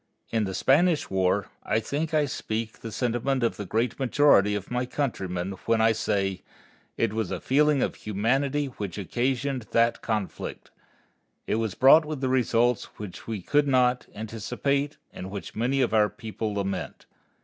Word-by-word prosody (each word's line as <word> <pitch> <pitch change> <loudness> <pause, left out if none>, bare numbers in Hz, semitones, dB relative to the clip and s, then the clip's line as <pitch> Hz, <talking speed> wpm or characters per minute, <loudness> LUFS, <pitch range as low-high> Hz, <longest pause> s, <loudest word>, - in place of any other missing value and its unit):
In 110 -2 +1
the 95 -1 -4
Spanish 160 +4 +3
War, 95 +1 +1
I 110 - 0
think 145 +8 -3
I 155 -2 +3
speak 110 -4 -4
the 115 - -7
sentiment 125 +3 0
of 115 - 0
the 100 - -5
great 115 +6 -1
majority 130 -6 +4
of 105 +2 -5
my 125 0 -1
countrymen 95 -10 -2 0.2
when 115 -1 +3
I 110 0 +5
say, 95 -3 -1 0.6
it 115 -2 +1
was 110 -4 -1
a - - -3
feeling 145 +1 +3
of - - -1
humanity 135 +8 0
which 105 -9 -6
occasioned 125 +4 -1
that 115 0 +3
conflict. 105 -4 -4 0.7
It 110 -2 -2
brought 145 +5 +7
with 150 -3 -5
it - - +2
results 120 -2 +2
which 105 -4 -8
we 110 -5 -4
could 145 +5 +2
not 125 -2 +2
anticipate 125 +7 -2 0.2
and 95 - -7
which 95 -3 -7
many 125 +5 +1
of 120 - +1
our 105 -1 +4
people 110 -2 -5
lament. 100 -1 -4
115 Hz, 160 wpm, -26 LUFS, 105-135 Hz, 0.7 s, brought